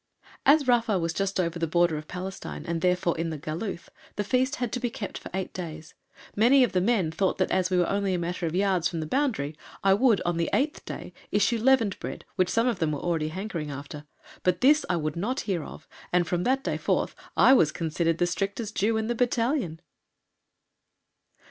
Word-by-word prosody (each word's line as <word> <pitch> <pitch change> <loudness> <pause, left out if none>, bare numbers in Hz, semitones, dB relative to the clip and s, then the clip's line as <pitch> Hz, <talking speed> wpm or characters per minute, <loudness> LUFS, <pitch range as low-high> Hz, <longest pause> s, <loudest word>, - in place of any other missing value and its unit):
As 285 -1 +5
Rafa 230 -4 +3
was 165 -1 -1
just 195 +1 -1
over 170 -1 -1
the 165 - 0
border 170 0 +2
of 155 0 -6
Palestine, 185 +1 -6
and 165 -1 -2
therefore 180 -1 +1
in 165 0 -1
the 160 - -4
"Galuth," 170 +5 -5 0.3
the 205 - -1
Feast 260 +6 +1
had 245 -5 -3
to 250 - -2
be 245 -1 -1
kept 220 -3 -6
for - - -9
eight 190 0 -4
days. 160 -3 -7 0.4
Many 250 +5 +6
of 245 - +1
the 180 - +1
men 195 -6 +1
thought 190 +3 0
that, 185 - 0
as 185 -1 +2
we 185 - +1
were 175 -1 +3
only 200 -1 0
a - - 0
matter 175 0 -2
of 160 - -3
yards 185 -3 +2
from 165 - -4
the 155 - -3
boundary, 215 - -1 0.3
I 195 0 +5
would 225 0 +4
on 175 -1 -1
the 170 - 0
eighth 295 +4 0
day - - -7 0.2
issue 210 +3 +2
leavened 230 -4 +3
bread, - - -6
which 185 -1 +2
some 230 +1 +2
of 235 -7 0
them 160 -3 +1
were 145 - -3
already 165 -2 -1
hankering 170 -2 -4
after, 145 +1 -7 0.4
but 180 -1 +1
this 295 +4 +5
I 180 - +2
would 155 -1 -2
not 225 +10 -1
hear 180 -6 -2
of, 155 - -11 0.2
and 175 0 +3
from 175 +1 -1
that 270 +1 +1
day - - -1
forth - - 0 0.2
I 265 - +7
was 160 - +4
considered 165 0 -1
the 175 - +2
strictest 200 +4 -3
Jew 220 +3 +1
in 220 - -1
the 240 - 0
battalion! 240 - 0
185 Hz, 220 wpm, -27 LUFS, 170-230 Hz, 0.4 s, I